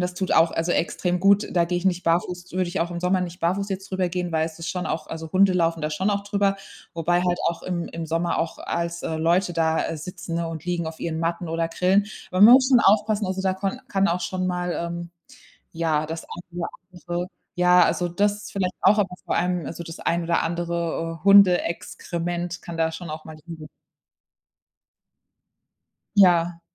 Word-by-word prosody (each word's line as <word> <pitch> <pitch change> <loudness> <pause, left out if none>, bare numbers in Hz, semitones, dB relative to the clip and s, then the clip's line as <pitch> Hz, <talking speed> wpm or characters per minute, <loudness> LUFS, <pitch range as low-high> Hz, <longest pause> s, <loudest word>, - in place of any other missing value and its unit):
das 180 0 -2
tut 190 +1 -3
auch 165 +1 +4
also 165 +2 -1
extrem 175 +1 0
gut. 200 +3 +4
Da 170 -2 +3
gehe 175 +1 -2
ich 175 - -3
nicht 180 -2 +1
barfuß 175 +2 -1
würde 185 -1 0
ich 190 - -3
auch 175 +1 -1
im 170 - -4
Sommer 185 +1 +1
nicht 180 0 -5
barfuß 195 +4 0
jetzt 195 0 -5
drüber 185 -1 0
gehen, 180 0 -3
weil 160 0 +1
es 160 - -9
ist 165 - -4
schon 180 -1 -3
auch 155 -1 -3
also, 160 -1 -7
Hunde 190 0 +5
laufen 165 -2 +1
da 150 0 -2
schon 190 +7 -1
auch 200 0 -1
drüber, 200 -1 +1 0.4
wobei 175 +2 +1
halt 175 -1 0
auch 170 - -4
im 175 -2 -3
im 165 0 -6
Sommer 165 +2 -1
auch 165 - -2
als, 170 0 -3
äh, 160 - -2
Leute 175 +3 +2
da, 160 -1 +1
äh, 165 - -4
sitzen, 170 +1 -6
ne, 170 0 -1
und 165 0 -7
liegen 175 -2 -2
auf 160 0 -7
ihren 160 -1 -3
Matten 170 +1 -2
oder 165 +1 0
grillen. 185 +4 +2 0.2
Man 185 +3 +5
muss 260 +3 +8
schon 255 - +6
aufpassen, 210 -1 +3
also 190 +1 -2
da 190 -1 +1
konn 195 +6 -3
kann 195 -5 +2
auch 175 0 0
schon 185 +1 -2
mal, 180 -1 -1
ähm, 170 0 -4 0.6
ja, 160 -2 0
das 160 +1 -6
ein 175 - -9 0.2
oder 170 - -2 0.2
andere 175 0 -4 0.3
Ja 180 0 +6
also, 175 - 0
das 205 +4 -1
vielleicht 185 -2 -2
auch, 205 +3 +6
aber 190 -3 0
vor - - -1
allem 180 -3 0
also, 170 +4 -6
das 165 0 -9
ein 170 0 0
oder 170 0 +1
andere 170 -1 -3
Hundeexkrement 175 -2 +2
kann 170 - -7
da 160 0 +2
schon 160 0 -7
auch 155 0 -7
mal 155 -1 -9
liegen. 160 -3 -9 2.5
Ja. 175 -3 +4
175 Hz, 205 wpm, -24 LUFS, 165-185 Hz, 2.5 s, muss